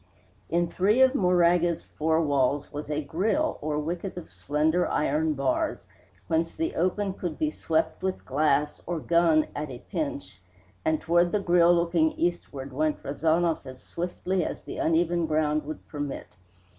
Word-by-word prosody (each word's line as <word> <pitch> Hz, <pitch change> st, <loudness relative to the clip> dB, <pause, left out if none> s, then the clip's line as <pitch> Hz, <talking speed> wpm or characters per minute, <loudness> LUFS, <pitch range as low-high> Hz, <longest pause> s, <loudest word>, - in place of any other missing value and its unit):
In 170 Hz, +2 st, +1 dB
three 200 Hz, +7 st, +2 dB
of 260 Hz, 0 st, +4 dB
Moraga's 175 Hz, -, +3 dB
four 160 Hz, +1 st, 0 dB
walls 140 Hz, 0 st, 0 dB
was 145 Hz, 0 st, -6 dB
a 150 Hz, 0 st, -1 dB
grille, 220 Hz, -, 0 dB
or 150 Hz, 0 st, -2 dB
wicket 175 Hz, +5 st, -4 dB
of 175 Hz, -, -8 dB
slender 155 Hz, +4 st, +1 dB
iron 155 Hz, +1 st, 0 dB
bars, 135 Hz, -1 st, -1 dB, 0.4 s
whence 165 Hz, 0 st, 0 dB
the 330 Hz, +1 st, -2 dB
open 190 Hz, +3 st, 0 dB
could 175 Hz, -5 st, -5 dB
be 155 Hz, -1 st, 0 dB
swept 160 Hz, +1 st, -1 dB
with 190 Hz, 0 st, -3 dB
glass, 150 Hz, +1 st, +1 dB
or 175 Hz, -1 st, -2 dB
gun 165 Hz, -1 st, +3 dB
at 150 Hz, 0 st, -4 dB
a 125 Hz, -, -7 dB
pinch; 150 Hz, -, -4 dB, 0.4 s
and 160 Hz, 0 st, +1 dB
toward 175 Hz, +1 st, +2 dB
the 210 Hz, -, +1 dB
grille 175 Hz, -2 st, +4 dB
looking 170 Hz, -2 st, +2 dB
eastward 145 Hz, -6 st, -3 dB
went 155 Hz, +2 st, -1 dB
Rezanov 160 Hz, +3 st, +1 dB
as 130 Hz, -1 st, -11 dB
swiftly 180 Hz, +1 st, -2 dB
as -, -, -5 dB
the -, -, -7 dB
uneven 170 Hz, +1 st, +1 dB
ground 155 Hz, -1 st, +1 dB
would 155 Hz, -, -7 dB
permit. 145 Hz, -2 st, -5 dB
160 Hz, 155 wpm, -27 LUFS, 150-175 Hz, 0.4 s, of